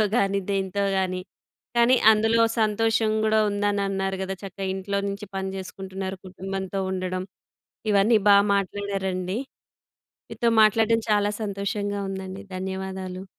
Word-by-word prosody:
పిల్లలతో 215 Hz, -, +5 dB
కానీ 200 Hz, -2 st, +2 dB
దేంతో 195 Hz, 0 st, -1 dB
గాని, 185 Hz, -1 st, 0 dB, 0.6 s
కానీ 240 Hz, +2 st, +5 dB, 0.2 s
అందులో 225 Hz, +2 st, +3 dB, 0.2 s
సంతోషం 220 Hz, +1 st, +2 dB
కూడా 220 Hz, 0 st, +3 dB
ఉందని 205 Hz, 0 st, 0 dB
అన్నారు 195 Hz, 0 st, -1 dB
కదా! 190 Hz, 0 st, -3 dB
చక్కగా 195 Hz, 0 st, -6 dB
ఇంట్లో 200 Hz, +1 st, -2 dB
నుంచి 200 Hz, +1 st, -5 dB
పని 190 Hz, 0 st, -2 dB
చేసుకుంటున్నారు 190 Hz, 0 st, -6 dB
కుటుంబంతో 195 Hz, +1 st, -4 dB
ఉండడం 185 Hz, 0 st, -2 dB, 0.7 s
ఇవన్నీ 210 Hz, +3 st, +5 dB
బాగా 200 Hz, 0 st, +7 dB
మాట్లాడారండి 195 Hz, 0 st, -2 dB, 0.9 s
మీతో 235 Hz, -, +1 dB
మాట్లాడడం 225 Hz, +1 st, +4 dB
చాలా 205 Hz, 0 st, +2 dB
సంతోషంగా 200 Hz, 0 st, -2 dB
ఉందండి. 190 Hz, +1 st, -6 dB
ధన్యవాదాలు. 190 Hz, 0 st, -5 dB
195 Hz, 120 wpm, -25 LUFS, 190-205 Hz, 0.9 s, బాగా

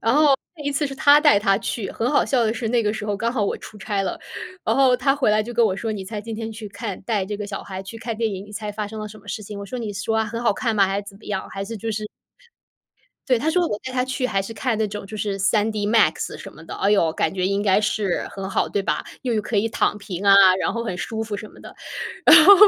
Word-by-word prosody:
然 225 Hz, +2 st, +2 dB
后 295 Hz, -2 st, +5 dB, 0.2 s
那 295 Hz, -, -9 dB
一 285 Hz, -, 0 dB
次 290 Hz, +1 st, 0 dB
是 275 Hz, -, -6 dB
他 285 Hz, +2 st, +6 dB
带 295 Hz, -9 st, +6 dB
她 195 Hz, -1 st, +2 dB
去， 215 Hz, -3 st, -3 dB
很 230 Hz, +2 st, -1 dB
好 295 Hz, -, +3 dB
笑 255 Hz, -3 st, +2 dB
的 220 Hz, -, +1 dB
是 230 Hz, -1 st, -3 dB
那 235 Hz, 0 st, +2 dB
个 210 Hz, -1 st, +1 dB
时 215 Hz, -1 st, -5 dB
候 205 Hz, -1 st, -1 dB
刚 230 Hz, +3 st, -1 dB
好 225 Hz, -5 st, +1 dB
我 -, -, -1 dB
出 215 Hz, -, -11 dB
差 200 Hz, 0 st, -1 dB
了， 190 Hz, -, -3 dB, 0.5 s
然 -, -, +2 dB
后 265 Hz, -2 st, +5 dB
他 275 Hz, +2 st, +2 dB
回 280 Hz, -6 st, +2 dB
来 215 Hz, 0 st, +3 dB
就 240 Hz, +3 st, -7 dB
跟 235 Hz, 0 st, +4 dB
我 190 Hz, -, 0 dB
说：” 225 Hz, +3 st, -3 dB
你 200 Hz, -3 st, -5 dB
猜 210 Hz, +2 st, -5 dB
今 225 Hz, +2 st, -6 dB
天 225 Hz, 0 st, -4 dB
去 215 Hz, -1 st, -8 dB
看 200 Hz, -1 st, -6 dB
带 205 Hz, -2 st, 0 dB
这 205 Hz, +1 st, -4 dB
个 205 Hz, 0 st, -5 dB
小 200 Hz, -1 st, -5 dB
孩 190 Hz, -1 st, -6 dB
去 195 Hz, +4 st, -9 dB
看 225 Hz, -1 st, -4 dB
电 225 Hz, -1 st, 0 dB
影， 190 Hz, 0 st, -6 dB
你 210 Hz, -, -13 dB
猜 210 Hz, 0 st, -4 dB
发 210 Hz, 0 st, -3 dB
生 220 Hz, 0 st, -7 dB
了 215 Hz, -, -5 dB
什 215 Hz, +1 st, -12 dB
么 205 Hz, 0 st, -18 dB
事 215 Hz, -, -4 dB
情？” 205 Hz, 0 st, -8 dB
我 200 Hz, -, -7 dB
说：” 250 Hz, +6 st, -5 dB
你 220 Hz, -3 st, -4 dB
说 205 Hz, +3 st, -1 dB
啊， 220 Hz, -, +2 dB
很 230 Hz, +2 st, -4 dB
好 235 Hz, -, +3 dB
看 230 Hz, +2 st, -1 dB
吗， 200 Hz, -1 st, +5 dB
还 195 Hz, +1 st, -1 dB
是 -, -, -13 dB
怎 195 Hz, -, -12 dB
么 -, -, -18 dB
样， 195 Hz, -2 st, -3 dB
还 195 Hz, -, -4 dB
是 225 Hz, +3 st, -6 dB
就 225 Hz, +2 st, -4 dB
是” 215 Hz, 0 st, -4 dB, 1.2 s
对， 255 Hz, -3 st, +4 dB
他 305 Hz, +6 st, +1 dB
说： 360 Hz, +1 st, +3 dB
“我 210 Hz, -, -3 dB
带 260 Hz, -, -4 dB
她 250 Hz, -1 st, +1 dB
去 260 Hz, 0 st, -2 dB
还 195 Hz, -5 st, 0 dB
是 195 Hz, -, -7 dB
看 230 Hz, +1 st, -1 dB
那 220 Hz, -, +1 dB
种， 205 Hz, 0 st, -6 dB
就 215 Hz, -, -7 dB
是 205 Hz, -2 st, -2 dB
3DMAX 210 Hz, -3 st, +2 dB
什 -, -, -9 dB
么 150 Hz, -, -13 dB
的。” -, -, -7 dB
哎 195 Hz, -, +2 dB
哟， 170 Hz, -6 st, +3 dB
感 160 Hz, -, 0 dB
觉 185 Hz, -1 st, -1 dB
应 200 Hz, +1 st, 0 dB
该 200 Hz, -1 st, +4 dB
是 210 Hz, -3 st, 0 dB
很 195 Hz, -1 st, -5 dB
好， -, -, +1 dB
对 200 Hz, -, -1 dB
吧？ -, -, -1 dB, 0.2 s
又 240 Hz, -5 st, 0 dB
可 230 Hz, -, -3 dB
以 220 Hz, +3 st, +2 dB
躺 220 Hz, -, +1 dB
平 195 Hz, -1 st, -6 dB
啊， 200 Hz, 0 st, +8 dB, 0.2 s
然 -, -, 0 dB
后 230 Hz, 0 st, -2 dB
很 220 Hz, -6 st, -3 dB
舒 220 Hz, +6 st, -3 dB
服 210 Hz, -2 st, -4 dB
什 215 Hz, -, -7 dB
么 -, -, -18 dB
的。 -, -, -11 dB, 0.5 s
然 -, -, +10 dB
后 400 Hz, -, +11 dB
215 Hz, 330 characters per minute, -23 LUFS, 200-230 Hz, 1.2 s, 后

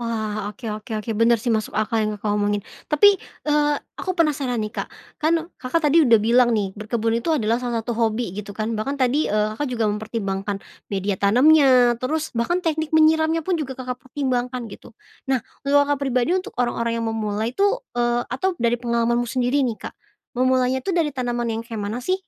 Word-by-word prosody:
Wah. 215 Hz, -3 st, -3 dB
Oke 210 Hz, +3 st, -11 dB
oke 215 Hz, +3 st, -13 dB
oke. 215 Hz, +2 st, -5 dB
Bener 235 Hz, +1 st, +5 dB
sih, 240 Hz, -, +1 dB
masuk 215 Hz, -1 st, -2 dB
akal 215 Hz, +1 st, 0 dB
yang 215 Hz, 0 st, 0 dB
Kakak 205 Hz, 0 st, -2 dB
omongin. 205 Hz, 0 st, 0 dB, 0.3 s
Tapi, 300 Hz, +7 st, +6 dB, 0.4 s
eee, 295 Hz, 0 st, +2 dB, 0.2 s
aku 375 Hz, -, -3 dB
penasaran 280 Hz, -6 st, +1 dB
nih, 215 Hz, 0 st, -5 dB
Kak. -, -, -4 dB, 0.3 s
Kan 315 Hz, +2 st, +3 dB, 0.3 s
Kakak 260 Hz, +6 st, 0 dB
tadi 310 Hz, -, +3 dB
udah 230 Hz, -2 st, +6 dB
bilang 240 Hz, +2 st, +4 dB
nih, 195 Hz, -2 st, -1 dB
berkebun 225 Hz, +1 st, -1 dB
itu 235 Hz, -, -5 dB
adalah 230 Hz, -2 st, +1 dB
salah 240 Hz, -2 st, -2 dB
satu 240 Hz, +1 st, -3 dB
hobi 225 Hz, -2 st, -1 dB
gitu 210 Hz, 0 st, -6 dB
kan. 220 Hz, +1 st, -2 dB
Bahkan 275 Hz, +6 st, -2 dB
tadi, 265 Hz, +4 st, +2 dB
eee, 210 Hz, 0 st, +1 dB
Kakak 290 Hz, +6 st, -2 dB
juga 230 Hz, -2 st, -1 dB
mempertimbangkan 205 Hz, -2 st, -3 dB, 0.3 s
media 200 Hz, 0 st, -1 dB
tanamnya, 250 Hz, +1 st, +5 dB
terus 310 Hz, +5 st, -2 dB
bahkan 235 Hz, +10 st, +1 dB
teknik 315 Hz, -1 st, -1 dB
menyiramnya 315 Hz, +1 st, +4 dB
pun 375 Hz, -, +1 dB
juga 265 Hz, -3 st, -4 dB
Kakak 250 Hz, -1 st, -4 dB
pertimbangkan 250 Hz, -2 st, -2 dB
gitu. 235 Hz, -, -13 dB, 0.3 s
Nah, 265 Hz, -1 st, +3 dB, 0.2 s
kalau 285 Hz, +1 st, +4 dB
Kakak 285 Hz, 0 st, 0 dB
pribadi, 255 Hz, 0 st, +1 dB
untuk 370 Hz, -, -8 dB
orang-orang 235 Hz, -1 st, 0 dB
yang 230 Hz, -, -2 dB
memulai 215 Hz, 0 st, -2 dB
tuh 405 Hz, -, +1 dB, 0.2 s
eee, 240 Hz, 0 st, +1 dB
atau 355 Hz, +10 st, -1 dB
dari 235 Hz, 0 st, +2 dB
pengalamanmu 235 Hz, 0 st, 0 dB
sendiri 255 Hz, +3 st, +1 dB
nih, 230 Hz, -3 st, -2 dB
Kak, -, -, -8 dB, 0.4 s
memulainya 255 Hz, 0 st, +2 dB
itu 390 Hz, -, -2 dB
dari 330 Hz, -4 st, +1 dB
tanaman 240 Hz, -2 st, -2 dB
yang 225 Hz, 0 st, -3 dB
kayak 230 Hz, -2 st, -6 dB
mana 205 Hz, +4 st, -3 dB
sih? 370 Hz, +9 st, +1 dB
240 Hz, 195 wpm, -22 LUFS, 220-280 Hz, 0.4 s, Tapi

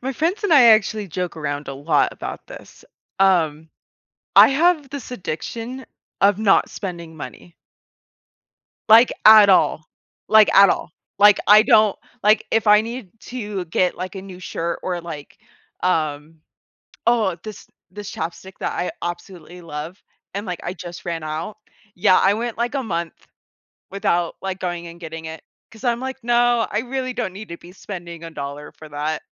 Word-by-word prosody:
my 265 Hz, +2 st, -3 dB
friends 345 Hz, -, -1 dB
and 395 Hz, -, +2 dB
I 280 Hz, -5 st, +8 dB
actually 215 Hz, -2 st, +3 dB
joke 180 Hz, +1 st, -4 dB
around 145 Hz, -1 st, -4 dB
a 135 Hz, -, -5 dB
lot 145 Hz, +4 st, +1 dB
about -, -, -8 dB
this, -, -, -13 dB, 0.3 s
um, 160 Hz, -5 st, +2 dB, 0.7 s
I -, -, +9 dB
have 305 Hz, 0 st, +2 dB
this 275 Hz, -3 st, -8 dB
addiction 235 Hz, +5 st, -6 dB, 0.4 s
of 200 Hz, 0 st, +4 dB
not 205 Hz, -3 st, +3 dB
spending 170 Hz, -4 st, -7 dB
money. 170 Hz, +2 st, -10 dB, 1.3 s
Like, 230 Hz, +3 st, +7 dB
at 215 Hz, -1 st, +9 dB
all. 180 Hz, -4 st, +3 dB, 0.4 s
Like, 220 Hz, -1 st, +6 dB
at 195 Hz, 0 st, +8 dB
all, -, -, -2 dB, 0.3 s
like, 205 Hz, 0 st, +7 dB
I 210 Hz, +1 st, +8 dB
don't 215 Hz, -4 st, +4 dB, 0.3 s
like, 210 Hz, +1 st, +3 dB
if 225 Hz, -1 st, +1 dB
I 210 Hz, 0 st, +7 dB
need 230 Hz, -2 st, -7 dB, 0.2 s
to 210 Hz, -6 st, -5 dB
get, 180 Hz, +3 st, 0 dB
like, 185 Hz, +2 st, -6 dB
a 190 Hz, -, -7 dB
new 185 Hz, -2 st, -11 dB
shirt 170 Hz, -1 st, -4 dB
or, 180 Hz, -1 st, -3 dB
like, 160 Hz, -4 st, -9 dB, 0.4 s
um 155 Hz, -2 st, -1 dB, 0.7 s
oh, 220 Hz, -6 st, +2 dB
this 215 Hz, -2 st, -10 dB, 0.2 s
this 205 Hz, +1 st, -8 dB
ChapStick 175 Hz, +3 st, -6 dB
that -, -, -2 dB
I 180 Hz, -, -2 dB
absolutely 175 Hz, 0 st, -7 dB
love, 160 Hz, +2 st, -8 dB, 0.3 s
and 200 Hz, +2 st, -4 dB
like, 180 Hz, -2 st, -5 dB
I 175 Hz, -, -4 dB
just 175 Hz, 0 st, -10 dB
ran 165 Hz, -2 st, -4 dB
out 155 Hz, +7 st, -5 dB, 0.4 s
yeah, 185 Hz, 0 st, +4 dB
I 195 Hz, -, +3 dB
went, 230 Hz, +2 st, -4 dB
like, 240 Hz, +4 st, -2 dB
a 270 Hz, -, -1 dB
month 170 Hz, -6 st, -3 dB, 0.8 s
without, 175 Hz, -3 st, -1 dB
like, 190 Hz, -1 st, -4 dB
going 175 Hz, -1 st, -4 dB
and 170 Hz, 0 st, -12 dB
getting 160 Hz, -1 st, -7 dB
it, 160 Hz, 0 st, -8 dB, 0.3 s
'cause 225 Hz, +2 st, -15 dB
I'm, 240 Hz, -2 st, 0 dB
like, 265 Hz, 0 st, -6 dB
"No, 240 Hz, -1 st, +2 dB
I 210 Hz, -, 0 dB
really 255 Hz, +1 st, -3 dB
don't 230 Hz, -7 st, -3 dB
need 210 Hz, +3 st, -10 dB
to 170 Hz, -, -7 dB
be 175 Hz, -, -15 dB
spending 175 Hz, -4 st, -9 dB
a 165 Hz, -, -7 dB
dollar 145 Hz, 0 st, -7 dB
for 155 Hz, -, -13 dB
that." 150 Hz, +2 st, -3 dB
190 Hz, 170 wpm, -21 LUFS, 170-220 Hz, 1.3 s, I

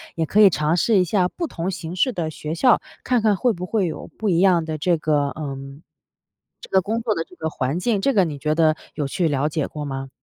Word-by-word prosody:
也 165 Hz, -, 0 dB
可 200 Hz, -, +1 dB
以 200 Hz, -, +9 dB
尝 155 Hz, 0 st, 0 dB
试 225 Hz, +3 st, +3 dB
一 -, -, +4 dB
下 180 Hz, +1 st, +1 dB
不 335 Hz, -, -4 dB
同 180 Hz, -, -4 dB
形 170 Hz, -2 st, -5 dB
式 250 Hz, +7 st, +1 dB
的 165 Hz, -5 st, -2 dB
学 155 Hz, +1 st, -5 dB
校， 245 Hz, +7 st, +4 dB, 0.2 s
看 250 Hz, -2 st, +1 dB
看 210 Hz, -2 st, +3 dB
会 245 Hz, +6 st, +2 dB
不 180 Hz, -1 st, -5 dB
会 200 Hz, -1 st, 0 dB
有 165 Hz, -, -5 dB
不 220 Hz, -, -1 dB
一 170 Hz, -2 st, +2 dB
样 180 Hz, -3 st, +4 dB
的 155 Hz, -1 st, -4 dB
这 170 Hz, +3 st, +1 dB
个， 150 Hz, -2 st, +1 dB
呃， 145 Hz, -3 st, -5 dB, 1.1 s
这 -, -, -11 dB
个 190 Hz, -, +4 dB
工 220 Hz, +5 st, -2 dB
作 225 Hz, -2 st, 0 dB
的 165 Hz, -, -2 dB
这 180 Hz, -, -17 dB
个 160 Hz, 0 st, -3 dB
环 135 Hz, +2 st, -2 dB
境。 210 Hz, +2 st, 0 dB
这 275 Hz, +7 st, +1 dB
个 195 Hz, -3 st, +4 dB
你 150 Hz, -3 st, -5 dB
觉 150 Hz, +2 st, 0 dB
得 155 Hz, -1 st, +3 dB, 0.2 s
有 145 Hz, -, -2 dB
去 165 Hz, +5 st, 0 dB
了 145 Hz, 0 st, 0 dB
解 155 Hz, -1 st, -1 dB
过 150 Hz, -1 st, -6 dB
吗？ 135 Hz, -1 st, -5 dB
170 Hz, 275 characters per minute, -22 LUFS, 155-200 Hz, 1.1 s, 以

